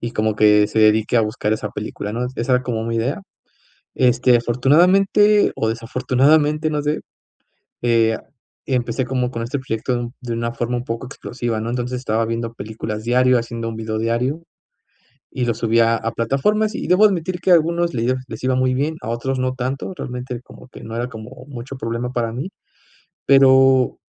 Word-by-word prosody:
y 120 - -4
como 110 0 0
que 105 -1 +5
se 110 - 0
dedique 110 +2 +3
a 115 - +4
buscar 105 0 -1
esa 110 -1 -3
película, 105 0 -5
¿no? 120 +2 -2
Esa 120 +3 -1
era 125 - +1
como 115 -3 -2
mi 115 0 -2
idea, 130 - -2 0.7
este, 125 -1 +4
afortunadamente, 180 - +4
o 110 - 0
desafortunadamente, 135 +7 +1
no 150 -1 -1
sé, 150 +1 -1 0.8
eh, 115 -2 +2 0.5
empecé 125 0 0
como 125 0 -1
con 115 -1 -4
este 135 +4 -3
proyecto 125 0 -3
de - - -1
un 120 0 -5
de 120 -1 -4
una 115 0 -2
forma 120 +1 -2
un 120 - -4
poco 115 +2 -4
explosiva, 120 -3 -4
¿no? 115 - -3
Entonces, 125 +1 -3
estaba 115 -2 0
viendo 115 0 -3
películas 110 0 -6
diario, 125 +1 +4
haciendo 115 0 -5
un 110 - -7
video 110 -1 -3
diario, 125 +8 -1 0.9
y 125 - -2
lo 115 - +2
subía 115 0 +2
a 115 - -3
plataformas, 210 - 0
y - - -4
debo 180 +4 +5
admitir 185 -2 -1
que 185 - 0
a - - +9
algunos 170 +2 -1
le 120 +2 +1
les - - -7
iba 130 0 +2
muy 130 0 +2
bien, 145 +5 -1
a 115 - -4
otros 130 +3 -2
no 130 0 0
tanto, 130 +7 -4
realmente 125 -1 -6
como - - -15
que - - -13
no 115 +1 -6
era 120 +1 -2
como 115 +3 -10
mucho 135 0 -8
problema 115 0 -3
para 115 -2 -1
mí, 130 +9 -4 0.8
pero 135 -1 +5
125 Hz, 190 wpm, -20 LUFS, 115-135 Hz, 0.9 s, a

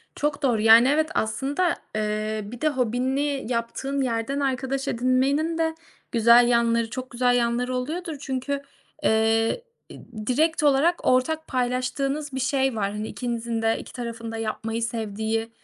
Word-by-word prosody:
Çok 295 0 -1
doğru. 240 -5 +2
Yani, 225 +3 +7
evet, 310 +3 +2
aslında, 270 +9 -1 0.3
ııı, 215 0 -2
bir 245 - -9
de 310 - +3
hobini 265 +2 -1
yaptığın 255 +4 -2
yerden 250 +2 -1
arkadaş 270 0 -1
edinmenin 270 +7 +1
de 320 -1 0 0.4
güzel 235 +1 +6
yanları 235 -1 +2
çok 255 +2 -6
güzel 245 0 +2
yanları 245 +1 0
oluyordur 320 +6 -3
çünkü, 265 0 -4 0.5
ııı, - - +5 0.8
e, - - -9 0.3
direkt 315 +5 +2
olarak 295 +5 +3
ortak 315 +5 +2
paylaştığınız 260 +3 -1
bir 265 - -2
şey 265 -1 +1
var, 200 -2 -1
hani, 210 +1 -4
ikinizin 235 -2 -3
de 225 0 +1
iki - - -11
tarafın 230 -2 -6
da 225 - -5
yapmayı 225 +1 -3
sevdiği 225 0 -2
250 Hz, 145 wpm, -25 LUFS, 230-275 Hz, 0.8 s, Yani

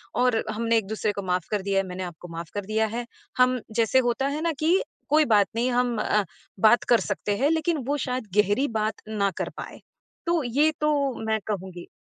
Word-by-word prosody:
और 250 -2 +2
हमने 230 +1 +1
एक-दूसरे 215 0 -1
को 200 - -4
माफ 180 -1 0
कर 210 -2 0
दिया 195 0 -1
है, 195 - -1
मैंने 185 +1 -5
आपको 175 -1 -8
माफ 165 -1 -6
कर 205 -1 -4
दिया 220 +2 +1
है। 240 0 -3 0.3
हम 255 0 +4 0.2
जैसे 230 +2 +3
होता 265 +3 0
है 290 +2 -2
ना 335 0 +1
कि 335 +5 +3 0.3
कोई 305 +1 +5
बात 210 -5 +4
नहीं 240 +2 +1
हम 245 -1 +1
अ, 210 0 +2 0.4
बात 220 +4 +5
कर 240 - +6
सकते 205 0 -2
हैं 280 +6 +2
लेकिन 325 0 +1
वो 290 +1 +1
शायद 250 -3 -3
गहरी 210 +7 +3
बात 215 +1 0 0.2
ना 200 -2 0
कर - - -2
पाए। - - -8 0.5
तो 340 -2 +2
ये 280 +6 +2
तो 300 - +3 0.4
मैं 220 0 +1
कहूँगी। 185 -4 -5
225 Hz, 210 wpm, -25 LUFS, 205-255 Hz, 0.5 s, कर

